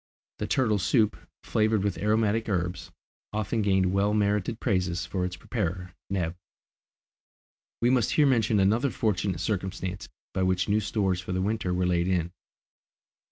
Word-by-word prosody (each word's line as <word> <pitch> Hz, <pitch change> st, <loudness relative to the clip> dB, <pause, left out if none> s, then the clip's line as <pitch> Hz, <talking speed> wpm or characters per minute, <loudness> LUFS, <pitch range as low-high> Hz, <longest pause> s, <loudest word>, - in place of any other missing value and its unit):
The -, -, -2 dB
turtle 110 Hz, -6 st, +2 dB
soup, 105 Hz, +2 st, +2 dB, 0.3 s
flavoured 110 Hz, -2 st, +1 dB
with 100 Hz, -2 st, -1 dB
aromatic 110 Hz, +1 st, +1 dB
herbs, 90 Hz, -2 st, -2 dB, 0.4 s
often 110 Hz, +1 st, -1 dB
gained 95 Hz, -2 st, +2 dB
well 100 Hz, +2 st, +2 dB
merited 105 Hz, +2 st, 0 dB
praises 90 Hz, -6 st, 0 dB
for 90 Hz, -2 st, -2 dB
its 90 Hz, 0 st, -4 dB
preparer, 90 Hz, -2 st, -3 dB, 0.2 s
Neb. 90 Hz, -3 st, -1 dB, 1.5 s
We 120 Hz, -, +4 dB
must 125 Hz, -4 st, +2 dB
here 150 Hz, -, +5 dB
mention 115 Hz, -5 st, +3 dB
another 110 Hz, +8 st, +3 dB
fortunate 100 Hz, -7 st, -1 dB
circumstance 95 Hz, -2 st, -3 dB, 0.2 s
by 95 Hz, -, -1 dB
which 95 Hz, 0 st, +1 dB
new 105 Hz, +1 st, +3 dB
stores 100 Hz, -3 st, 0 dB
for 90 Hz, -, -5 dB
the 95 Hz, -, 0 dB
winter 105 Hz, -2 st, -1 dB
were 90 Hz, 0 st, +1 dB
laid 90 Hz, 0 st, +1 dB
in. 90 Hz, -2 st, 0 dB
100 Hz, 150 wpm, -27 LUFS, 90-110 Hz, 1.5 s, here